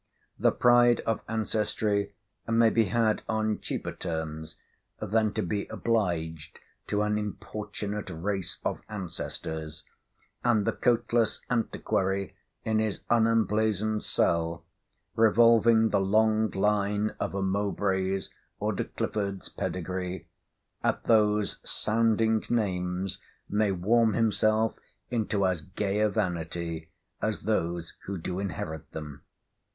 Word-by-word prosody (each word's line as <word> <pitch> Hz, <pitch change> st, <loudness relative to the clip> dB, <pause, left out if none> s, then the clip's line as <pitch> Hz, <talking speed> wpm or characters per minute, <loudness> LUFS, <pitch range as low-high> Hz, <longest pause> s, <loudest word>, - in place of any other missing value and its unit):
The -, -, +4 dB
pride 120 Hz, -1 st, +5 dB
of 115 Hz, -1 st, -1 dB
ancestry 105 Hz, -2 st, 0 dB, 0.3 s
may 115 Hz, 0 st, +4 dB
be 115 Hz, 0 st, +3 dB
had 110 Hz, +2 st, +1 dB
on 110 Hz, -1 st, 0 dB
cheaper -, -, -4 dB
terms 80 Hz, -1 st, -5 dB, 0.4 s
than 110 Hz, +1 st, +1 dB
to 110 Hz, -, -1 dB
be 100 Hz, +3 st, -2 dB
obliged 85 Hz, -9 st, -1 dB, 0.3 s
to 105 Hz, 0 st, +1 dB
an 105 Hz, 0 st, +1 dB
importunate 105 Hz, 0 st, -5 dB
race 95 Hz, +2 st, -3 dB
of -, -, -1 dB
ancestors; 80 Hz, -5 st, -5 dB, 0.6 s
and 115 Hz, -4 st, +3 dB
the -, -, +2 dB
coatless 120 Hz, -2 st, +1 dB
antiquary 100 Hz, -4 st, 0 dB, 0.3 s
in 110 Hz, -1 st, +2 dB
his 110 Hz, -2 st, -1 dB
unemblazoned 110 Hz, -2 st, +2 dB
cell, 85 Hz, 0 st, 0 dB, 0.5 s
revolving 115 Hz, 0 st, +5 dB
the 100 Hz, -, +2 dB
long 110 Hz, +2 st, +3 dB
line 105 Hz, +2 st, +1 dB
of -, -, -2 dB
a 100 Hz, -, 0 dB
Mowbray's 95 Hz, -1 st, 0 dB, 0.3 s
or -, -, 0 dB
De -, -, -2 dB
Clifford's 100 Hz, -2 st, -3 dB
pedigree, 90 Hz, -1 st, -4 dB, 0.6 s
at -, -, +1 dB
those 105 Hz, -2 st, +3 dB
sounding 110 Hz, 0 st, +1 dB
names 95 Hz, -4 st, -1 dB, 0.3 s
may 105 Hz, -1 st, +2 dB
warm 110 Hz, +5 st, +3 dB
himself 110 Hz, 0 st, +2 dB, 0.4 s
into 105 Hz, -4 st, +1 dB
as 90 Hz, -4 st, 0 dB
gay 95 Hz, +4 st, -2 dB
a 105 Hz, 0 st, +4 dB
vanity 85 Hz, -3 st, -3 dB, 0.3 s
as 110 Hz, -1 st, -1 dB
those 85 Hz, -5 st, -1 dB
who 100 Hz, 0 st, -3 dB
do 90 Hz, +2 st, -4 dB
inherit 80 Hz, -5 st, -5 dB
them. 75 Hz, -3 st, -7 dB
105 Hz, 115 wpm, -28 LUFS, 90-110 Hz, 0.6 s, pride